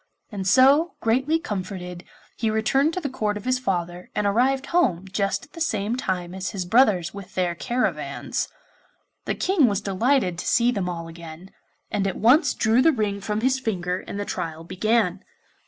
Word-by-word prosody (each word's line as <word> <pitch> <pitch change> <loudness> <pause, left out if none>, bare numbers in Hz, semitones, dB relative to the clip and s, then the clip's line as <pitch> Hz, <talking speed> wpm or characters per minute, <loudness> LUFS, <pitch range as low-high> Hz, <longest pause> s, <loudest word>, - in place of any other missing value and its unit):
And 195 -3 -4
so, 275 - +5
greatly 265 +8 +2
comforted, 185 - -5 0.3
he 225 - -1
returned 270 +8 +2
to - - -1
the 315 - -3
Court 215 -6 -2
of 205 - -9
his 255 0 +1
father, 180 -6 -3
and 210 - 0
arrived 260 +7 +2
home 195 - +2
just 195 0 -1
at - - -30
the 335 - -9
same 215 -6 0
time 185 -8 -3
as 190 0 -4
his 190 -3 -4
brothers 195 -4 +3
with 200 -1 -10
their 180 -2 +1
caravans. 240 +8 -2 0.8
The - - -1
King 365 -8 +3
was 200 -3 0
delighted 200 -2 +1
to - - -5
see 240 0 +3
them 195 -6 -2
all 170 -1 -5
again, 165 +2 -11 0.4
and 200 -1 0
at 190 - -3
once 255 - +4
drew 225 +2 +3
the 325 - +5
ring 210 -6 -2
from 210 +2 -2
his 260 +2 +2
finger 180 -7 -2
and 200 - -5
the 205 - -2
trial 165 -3 -4
began. 190 +1 0
210 Hz, 185 wpm, -24 LUFS, 185-255 Hz, 0.8 s, so